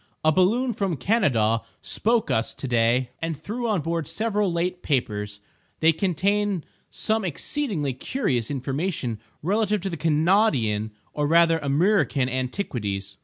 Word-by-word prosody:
A 155 - +6
balloon 225 +9 +2
from 190 -7 -1
Kanadaw 125 - +2 0.2
spoke 230 0 0
us 110 +1 0
to 135 - -5
day 120 +1 +2
and 165 -2 -2
threw 230 - -4
on 210 -6 +1
board 165 -1 -2
several 210 -3 0
late 180 +1 -1
papers; 105 -7 -2 0.4
they 160 +1 +5
contain 195 +2 0 0.3
some 220 -1 0
exceedingly 180 - -1
curious 130 - -1
information 135 - -2 0.2
relative 210 +3 +1
to 190 -2 -3
Kanawdian 150 - +2 0.2
or 150 -1 0
rather 165 +1 +4
Amriccan 145 -2 +2
antiquities. 120 - -3
165 Hz, 125 wpm, -24 LUFS, 125-200 Hz, 0.4 s, A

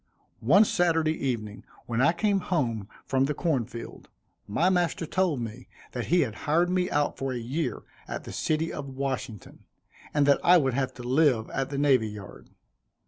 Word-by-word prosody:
One 185 - +5
Saturday 165 -4 +2
evening, 115 -8 -4 0.2
when 115 0 -1
I 160 - +5
came 200 +3 +1
home 115 - -2 0.2
from 135 0 +2
the 150 +1 -2
corn 145 -9 0
field, 115 +1 -10 0.4
my 160 - +1
master 175 -2 +1
told 175 -4 0
me 115 +2 -7 0.2
that 120 - -4
he 175 +2 +4
had 120 -8 -1 0.2
hired 170 +4 +3
me 180 0 +1
out 145 0 0
for 135 0 -2
a - - -3
year 125 +4 -3 0.2
at - - -5
the - - -8
city 160 +1 -1
of 140 -1 -6
Washington, 130 -6 -5 0.5
and 145 -1 +2
that 140 0 +4
I 180 +1 +7
would 135 -6 +1
have 130 0 -1
to 125 - -9
live 125 -3 +2
at 135 0 -2
the 140 - -4
Navy 135 -6 +3
Yard. 105 -3 -10
140 Hz, 185 wpm, -27 LUFS, 120-165 Hz, 0.5 s, I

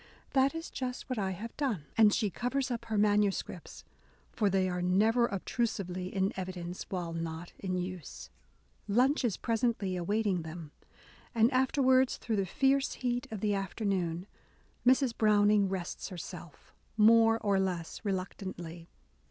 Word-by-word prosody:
That 275 +2 +3
is 325 +1 -6
just 255 -2 -4
what 250 - -1
I 195 -2 0
have 210 +5 -6
done 230 - -1
!" - - -32
and 215 -2 +6
she 210 -2 0
covers 255 +5 -1
up 235 -1 -3
her 220 -2 -2
manuscripts, 205 -4 0 0.5
for 210 -3 +1
they 190 -1 +2
are 180 -1 -2
never 215 +7 +3
obtrusively 195 -3 -2
in 190 +1 0
evidence 180 -1 -5
while 175 -3 -3
not 165 +1 -5
in 185 -2 -2
use. 180 -4 -6 0.6
Lunch 255 +8 +3
is 225 -6 0
presently 225 -5 0
awaiting 195 +1 0
them; 160 -1 -8 0.6
and 230 +3 +4
after 265 +2 +2
wards, 260 0 +4
through 225 -3 -2
the 195 -1 0
fierce 270 +6 +2
heat 245 -1 -2
of 215 -3 -6
the 210 -1 +1
afternoon, 190 -3 -2 0.6
Mrs. 255 -2 +4
Browning 210 -2 +4
rests 185 -1 -4
herself 175 -3 -9
— - - -37
more 225 +1 +6
or 200 -3 +1
less 180 -4 -2
reluc 190 -3 -2
tantly. 170 -4 -7
205 Hz, 155 wpm, -31 LUFS, 180-230 Hz, 0.6 s, and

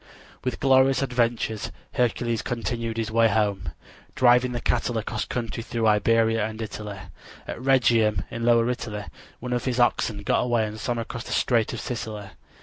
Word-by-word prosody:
With 125 -2 -2
glorious 135 0 +4
adventures 120 -4 -1 0.2
Hercules 120 -1 0
continued 115 -1 -3
his 110 -1 -2
way 115 0 +4
home, 100 -4 0 0.5
driving 125 0 +4
the 120 - -2
cattle 120 0 0
across 110 - -3
country 115 -1 -4
through 115 0 -2
Iberia 115 +1 +3
and 110 +1 -4
Italy. 105 -2 -6 0.5
At - - -6
Rhegium 120 -6 +3
in 115 0 -4
lower 115 0 +4
Italy 115 -4 -3 0.4
one 125 +1 -4
of 120 -1 -1
his 125 -1 -1
oxen 110 -3 +1
got - - +2
away 120 -2 +1
and 105 +1 -7
swam 120 +2 -2
across 115 +1 -5
the - - -4
strait 115 -3 +2
to 120 - -5
Sicily. 110 -4 -5
115 Hz, 165 wpm, -25 LUFS, 110-120 Hz, 0.5 s, glorious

